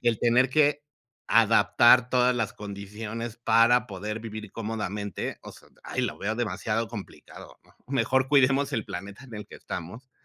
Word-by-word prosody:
el 120 -3 +2
tener 125 +2 +3
que 145 0 +3 0.5
adaptar 115 +2 +5
todas 125 0 +3
las 115 -3 -2
condiciones 105 +3 -7
para 120 +1 +4
poder 105 +2 -5
vivir 110 -2 -8
cómodamente, 105 -3 -4
o - - -10
sea, - - -18 0.2
¡ay!, - - -3
lo - - -3
veo 105 +2 -2
demasiado 110 0 -2
complicado, 105 -4 -11
¿no? - - -25
Mejor 130 -1 +1
cuidemos 135 0 +3
el 110 - -1
planeta 100 +3 -8
en 120 -4 -11
el 105 -1 -8
que - - -14
estamos, 95 +9 -8
115 Hz, 160 wpm, -26 LUFS, 105-125 Hz, 0.5 s, adaptar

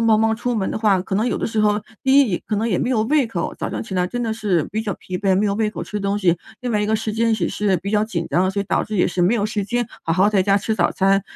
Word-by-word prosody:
忙 225 -2 +4
忙 225 0 +2
出 240 +2 -2
门 195 -3 -1
的 - - -3
话， 210 -4 +3
可 190 - -4
能 215 +4 +1
有 - - -1
的 - - -2
时 220 -1 -1
候 210 0 +3 0.2
第 270 +1 +5
一， 205 -10 0
可 210 - -1
能 220 - 0
也 200 -6 0
没 - - -1
有 240 -4 +2
胃 280 +3 +2
口， 180 -7 -3
早 - - -2
上 - - -4
起 220 - -9
来 180 -1 +1
真 245 +5 -3
的 225 -2 -1
是 200 -8 0
比 220 - -1
较 205 -4 -3
疲 180 -1 -6
惫， 195 -2 +2
没 205 - +2
有 200 - +1
胃 215 0 0
口 210 - -6
吃 210 - -5
东 200 +1 -1
西。 175 -3 +2 0.2
另 245 - -2
外 210 - +1
一 210 - 0
个 220 - +2
时 220 0 -3
间 230 0 +2
也是 200 0 0
比 190 +4 -5
较 210 0 +2
紧 185 -7 -3
张， 185 +2 +2
所 200 +1 -1
以 - - -10
导 - - 0
致 215 - -4
也 180 - +3
是 180 - -2
没 180 +6 +3
有 210 -4 0
时 210 -1 -1
间 240 +3 -1 0.2
好 - - -4
好 195 +4 +4
在 195 -3 +3
家 195 +1 +3
吃 220 +2 -1
早 175 -4 +2
餐， 195 +1 +2
210 Hz, 360 characters per minute, -21 LUFS, 190-225 Hz, 0.2 s, 第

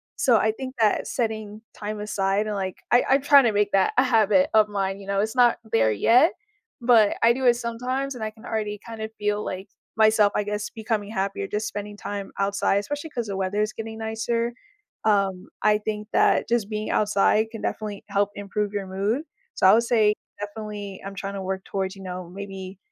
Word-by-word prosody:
so, 240 -4 +4
I 220 +1 +2
think 260 +3 -7
that 215 -2 +2
setting 220 -3 -3
time 210 0 -5
aside 200 0 0
and, 210 - -2
like 190 -2 -3
I 245 - +5
I'm 270 +1 +4
trying 280 -2 +7
to 225 - +3
make 205 0 +1
that 195 -1 +3
a - - +6
habit 215 -6 +3
of 215 -1 +5
mine, 195 -1 -2
you 195 - -11
know? 200 0 +1
It's 220 +4 -2
not 245 -1 +5
there 110 -1 +3
yet, 245 - +4 0.5
but 230 -4 +5
I 235 +1 +6
do 260 0 -3
it 240 -1 +6
sometimes, 250 +4 -3
and 225 - -6
I 215 - -1
can 220 0 -16
already 210 -2 -3
kind 225 -1 -8
of 220 - -3
feel, 210 0 0
like, 190 +2 -5 0.3
myself, 215 -2 +5
I 210 - +1
guess, 210 0 -3
becoming 220 -2 -3
happier, 195 -1 -2
just 210 +2 -2
spending 205 0 -6
time 200 -1 -5
outside, 200 0 +1
especially 290 +8 -5
'cause 240 -4 -3
the 200 - -3
weather 195 +2 -1
is 215 - -3
getting 225 0 -6
nicer. 230 +2 -1 0.5
Um, 195 -3 +1 0.2
I 210 0 +4
think 210 0 -4
that - - +3
just 230 -3 +1
being 215 0 -3
outside 210 +1 +2
can 225 - -7
definitely 210 -2 -4
help 200 0 +1
improve 205 +1 -3
your 200 -1 -2
mood. 205 +9 -1 0.3
So, - - +1
I 190 - +8
would 230 - +5
say, 220 -3 +3 0.3
definitely, 205 -1 -6
I'm 195 0 -6
trying 195 +1 -5
to 195 - -4
work 190 0 -3
towards, 190 0 -3
you 195 - -11
know, 180 -1 -6
maybe 190 0 -8
210 Hz, 210 wpm, -24 LUFS, 200-225 Hz, 0.5 s, I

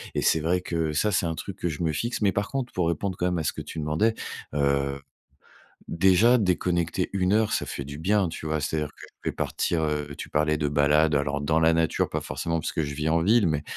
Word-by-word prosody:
et - - +1
c'est 80 - +3
vrai 90 +3 +1
que 80 -3 -2
ça, 105 +8 +1
c'est 95 - +1
un 80 -1 -2
truc 100 +2 -7
que 90 - -2
je 80 +1 -4
me 80 - +1
fixe. 120 +10 -2
Mais 100 -2 +3
par 100 +3 -2
contre, 135 -3 -3
pour 90 -2 0
répondre 90 +3 -2
quand 90 - -1
même 90 -1 0
à 80 - -2
ce - - -1
que - - -6
tu 80 - -7
demandais, 80 +10 +1 0.4
heu, 70 -1 +1 0.9
déjà 95 +8 +4
déconnecter 90 -3 0
une 95 -1 +1
heure, 110 0 +2
ça - - 0
fait 70 - -5
du 70 +1 -7
bien, 95 +3 +2
tu 80 - -7
vois? 80 0 0
C'est 75 - -2
à - - +1
dire 75 - -3
que - - -13 0.2
je - - -1
vais - - -1
partir, 85 -2 -1
heu 75 -1 -2
tu - - -7
parlais 75 +1 +1
de 75 -1 0
balade, 75 +2 +3
alors 70 0 0
dans 80 +2 +2
la 80 0 +4
nature 80 0 +1
pas - - -2
forcément, 85 0 -2
parce - - -4
que 80 - 0
je 70 0 -4
vis 75 +2 -1
en 80 +1 +2
ville. 105 -1 +4
Mais, 75 -2 -1
80 Hz, 260 wpm, -26 LUFS, 75-90 Hz, 0.9 s, déjà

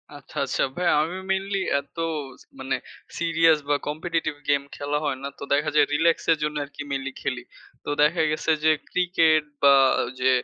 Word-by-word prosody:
আচ্ছা, - - -15
আচ্ছা। - - 0
ভাইয়া 180 -1 +2
আমি 175 +4 -4
mainly 195 +1 -1 0.2
এত 140 - -15 0.4
ছ - - -18 0.2
মানে 130 - -1 0.4
serious 165 -1 +3
বা 145 - +4
competitive 160 0 -2
গেম 140 -1 +3
খেলা 145 +1 -2
হয় 135 -2 -1
না। - - -2
তো - - -7
দেখা 150 +2 +1
যায় 145 - +6
relax 165 +2 +3
এর 160 - +3
জন্য 150 0 -2
আরকি 145 +1 -11
mainly 135 0 -3
খেলি। 125 -2 -3 0.4
তো - - -6
দেখা 160 +3 +3
গেছে 155 +1 0
যে 155 - +5 0.2
ক্রিকেট 165 -4 +3 0.2
বা 140 0 +8 0.5
যে 130 +1 +3
155 Hz, 180 wpm, -24 LUFS, 145-165 Hz, 0.5 s, বা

